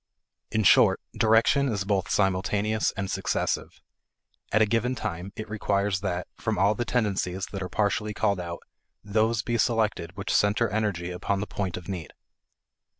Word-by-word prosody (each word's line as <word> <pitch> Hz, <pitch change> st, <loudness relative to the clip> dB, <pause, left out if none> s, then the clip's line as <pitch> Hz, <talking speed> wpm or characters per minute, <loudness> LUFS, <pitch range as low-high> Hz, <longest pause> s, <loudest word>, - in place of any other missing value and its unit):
In 110 Hz, -, 0 dB
short, -, -, +6 dB, 0.2 s
direction 115 Hz, +5 st, +4 dB
is 100 Hz, -4 st, -1 dB
both 95 Hz, -2 st, 0 dB
simultaneous 100 Hz, +3 st, +1 dB
and 95 Hz, 0 st, -2 dB
successive. -, -, -2 dB, 0.7 s
At 110 Hz, +1 st, +4 dB
a -, -, +4 dB
given 115 Hz, +4 st, 0 dB
time, 100 Hz, -4 st, -4 dB
it 110 Hz, -, -6 dB
requires 100 Hz, -2 st, 0 dB
that, 90 Hz, -2 st, -2 dB
from 110 Hz, -2 st, -1 dB
all 100 Hz, +3 st, +4 dB
the 120 Hz, +3 st, -3 dB
tendencies 100 Hz, -6 st, -1 dB
that 100 Hz, -, -5 dB
are 90 Hz, -, -4 dB
partially 105 Hz, +1 st, 0 dB
called 100 Hz, -4 st, +1 dB
out, 85 Hz, -1 st, -6 dB, 0.4 s
those 110 Hz, +1 st, +1 dB
be 120 Hz, -1 st, -1 dB
selected 105 Hz, -6 st, 0 dB
which 100 Hz, -, -2 dB
center 105 Hz, +3 st, +3 dB
energy 100 Hz, -4 st, -1 dB
upon 95 Hz, +2 st, -1 dB
the 105 Hz, -, -2 dB
point 95 Hz, -4 st, -3 dB
of 90 Hz, -, -9 dB
need. 90 Hz, -6 st, -5 dB
100 Hz, 160 wpm, -26 LUFS, 95-110 Hz, 0.7 s, short